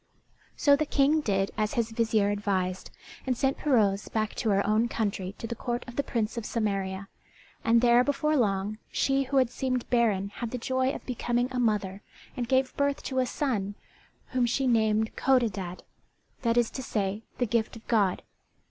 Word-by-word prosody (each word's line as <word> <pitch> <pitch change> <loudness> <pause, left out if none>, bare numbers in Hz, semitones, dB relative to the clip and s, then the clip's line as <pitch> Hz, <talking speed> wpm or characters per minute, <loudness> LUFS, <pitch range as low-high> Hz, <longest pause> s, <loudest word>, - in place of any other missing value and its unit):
So 285 -1 +5
the 305 +1 -1
King 290 +3 +3
did 195 -6 0
as 215 0 0
his 230 -1 0
vizier 220 -3 +2
advised, 190 -3 -1 0.4
and 255 -2 +1
sent 270 +2 0
Pirouzè 210 -8 +2
back 215 -1 -1
to 225 - -1
her 200 -1 +2
own 215 +3 +2
country 200 -4 -2
to - - -6
the 230 - -3
court 240 +1 -3
of 245 - -9
the - - +2
Prince 230 -4 -2
of 235 - -2
Samaria; 195 -3 -2 0.6
and 230 0 +4
there 240 0 +5
before 295 +3 +1
long 205 -3 0
she 270 0 +1
who 275 +2 -1
had 255 -3 +3
seemed 255 -2 -2
barren 215 -5 +2
had 230 +3 -5
the 250 - -4
joy 260 +2 0
of 275 - -5
becoming 245 0 -1
a 255 - -2
mother 205 -4 0 0.3
and 240 -1 -3
gave 260 -1 +2
birth 280 0 0
to 260 -1 -1
a 255 - +1
son 215 -8 -2 0.5
whom 250 -2 +1
she 265 +3 0
named 220 -2 +2
Codadad, 205 -9 0 0.6
that 235 -1 +1
is 240 -1 +3
to 265 - -5
say, 205 -4 -2 0.2
"the 245 - +1
Gift 230 0 0
of 225 - -13
God." 205 -6 +2
230 Hz, 185 wpm, -28 LUFS, 205-255 Hz, 0.6 s, So